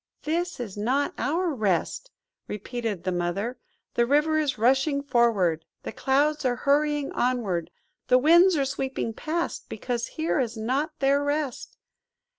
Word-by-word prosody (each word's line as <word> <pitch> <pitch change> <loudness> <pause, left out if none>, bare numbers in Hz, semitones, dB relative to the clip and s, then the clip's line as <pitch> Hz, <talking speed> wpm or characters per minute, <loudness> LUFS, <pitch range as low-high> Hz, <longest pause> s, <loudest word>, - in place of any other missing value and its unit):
"This 340 +1 -2
is 220 -6 -5
not 260 +7 0
our 330 +6 0
Rest!" 215 - -1 0.4
repeated 210 -2 -4
the 185 - -1
Mother. 195 +8 -2 0.3
"The 235 0 +2
river 300 +3 +3
is 290 -4 0
rushing 270 +5 +2
forward; 210 - +2 0.2
the - - -5
clouds 295 +3 +1
are 250 -2 +1
hurrying 290 +1 +1
onward; 205 -10 -1 0.4
the 255 - +6
winds 340 +6 +6
are 275 - +1
sweeping 265 -3 -3
past, 330 +8 -3
because 240 -2 -3
here 315 -1 0
is 235 -3 -2
not 270 +8 -1
their 280 +1 +3
Rest. 285 -3 -3
265 Hz, 140 wpm, -26 LUFS, 230-300 Hz, 0.4 s, the